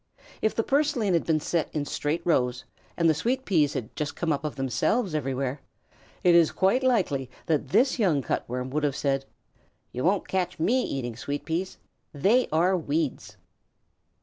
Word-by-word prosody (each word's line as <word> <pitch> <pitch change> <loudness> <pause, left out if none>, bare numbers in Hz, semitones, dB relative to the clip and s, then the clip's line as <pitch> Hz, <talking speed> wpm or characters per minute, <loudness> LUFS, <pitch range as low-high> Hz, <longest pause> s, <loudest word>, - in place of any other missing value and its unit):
If 220 - +1
the 225 - +1
purslane 275 -8 +1
had 170 - +1
been 160 -2 +3
set 165 +1 -1
in 145 -2 -1
straight 150 +4 -2
rows, 125 -7 +1 0.3
and 170 - +3
the 160 - +5
sweet 250 - -1
peas 155 -7 +2
had 120 -5 -5
just 145 -1 -3
come 165 -3 0
up 140 - -3
of 150 - -3
themselves 155 - 0
everywhere, 135 -1 -2 0.6
it 180 - +5
is 170 -2 +5
quite 195 +8 +2
likely 180 - +1 0.2
that 150 -3 0
this 255 - +3
young 165 - +2
Cut - - -1
Worm 125 +1 -3
would 150 +2 -1
have 145 -2 +1
said: 135 -2 0 0.7
"You 125 - -4
won't 190 +2 +1
catch 180 -1 -1
me 245 +10 +2
eating 120 - -3
sweet 140 +5 -4
peas. 175 +3 -3 0.4
They 215 - +3
are 175 +4 +3
weeds." 155 -3 -2
160 Hz, 175 wpm, -26 LUFS, 140-190 Hz, 0.7 s, the